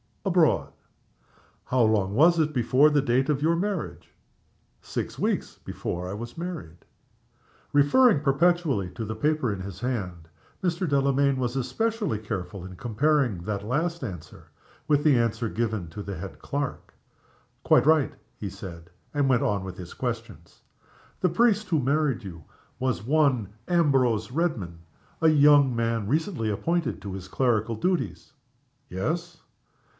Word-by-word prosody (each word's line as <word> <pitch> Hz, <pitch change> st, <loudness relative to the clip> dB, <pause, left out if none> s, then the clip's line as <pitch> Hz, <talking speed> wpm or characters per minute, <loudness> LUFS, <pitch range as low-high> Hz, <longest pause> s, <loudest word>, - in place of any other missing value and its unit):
"Abroad." -, -, +2 dB, 0.9 s
"How 130 Hz, -1 st, +1 dB
long 105 Hz, -4 st, +2 dB
was 165 Hz, +6 st, +5 dB
it 155 Hz, -1 st, +1 dB
before 130 Hz, +3 st, +4 dB
the 145 Hz, -1 st, +2 dB
date 130 Hz, +1 st, +2 dB
of 145 Hz, -2 st, +1 dB
your 165 Hz, +2 st, +3 dB
marriage?" 190 Hz, 0 st, -3 dB, 0.7 s
"Six -, -, -5 dB
weeks -, -, -1 dB
before 90 Hz, +1 st, -4 dB
I -, -, -4 dB
was 120 Hz, +7 st, -7 dB
married." 165 Hz, -, -7 dB, 0.9 s
Referring 145 Hz, -, +5 dB
perpetually 150 Hz, -, +2 dB
to 110 Hz, -, -5 dB
the 110 Hz, +1 st, -4 dB
paper 150 Hz, 0 st, 0 dB
in 100 Hz, -, -6 dB
his 95 Hz, -1 st, -7 dB
hand, 95 Hz, -10 st, -4 dB, 0.4 s
Mr. 180 Hz, 0 st, 0 dB
Delamayn 140 Hz, 0 st, +2 dB
was 125 Hz, -1 st, -2 dB
especially 195 Hz, -, -1 dB
careful 95 Hz, -4 st, -5 dB
in 95 Hz, 0 st, -9 dB
comparing 120 Hz, -, +1 dB
that 100 Hz, 0 st, -3 dB
last 165 Hz, +7 st, -1 dB
answer 90 Hz, -10 st, -8 dB, 0.4 s
with 145 Hz, -1 st, +3 dB
the 145 Hz, -5 st, +5 dB
answer 115 Hz, -1 st, 0 dB
given 110 Hz, -6 st, -2 dB
to 90 Hz, +6 st, -7 dB
the 100 Hz, -1 st, -6 dB
head 95 Hz, +3 st, -8 dB
clerk. 140 Hz, -1 st, -4 dB, 0.7 s
"Quite -, -, +4 dB
right," 155 Hz, -3 st, +4 dB, 0.2 s
he 100 Hz, -, -5 dB
said, 85 Hz, -2 st, -10 dB, 0.2 s
and 145 Hz, -2 st, +1 dB
went 125 Hz, -3 st, +3 dB
on 100 Hz, -2 st, 0 dB
with 95 Hz, -1 st, -7 dB
his 90 Hz, -2 st, -9 dB
questions. -, -, -6 dB, 0.6 s
"The 185 Hz, -, +2 dB
priest 215 Hz, +2 st, +2 dB
who 160 Hz, -4 st, +2 dB
married 140 Hz, -2 st, +1 dB
you 85 Hz, -5 st, -9 dB, 0.4 s
was 125 Hz, -7 st, -1 dB
one 130 Hz, -8 st, +2 dB
Ambrose 130 Hz, -, +2 dB
Redman 125 Hz, -, -2 dB, 0.4 s
a 160 Hz, -, +4 dB
young 145 Hz, -3 st, +5 dB
man 115 Hz, -2 st, -1 dB
recently 155 Hz, -, -1 dB
appointed 165 Hz, +9 st, -1 dB
to 100 Hz, -2 st, -5 dB
his 95 Hz, -1 st, -7 dB
clerical 115 Hz, 0 st, 0 dB
duties?" 110 Hz, -, -2 dB, 0.6 s
"Yes." 165 Hz, -, -3 dB
130 Hz, 145 wpm, -26 LUFS, 105-155 Hz, 0.9 s, was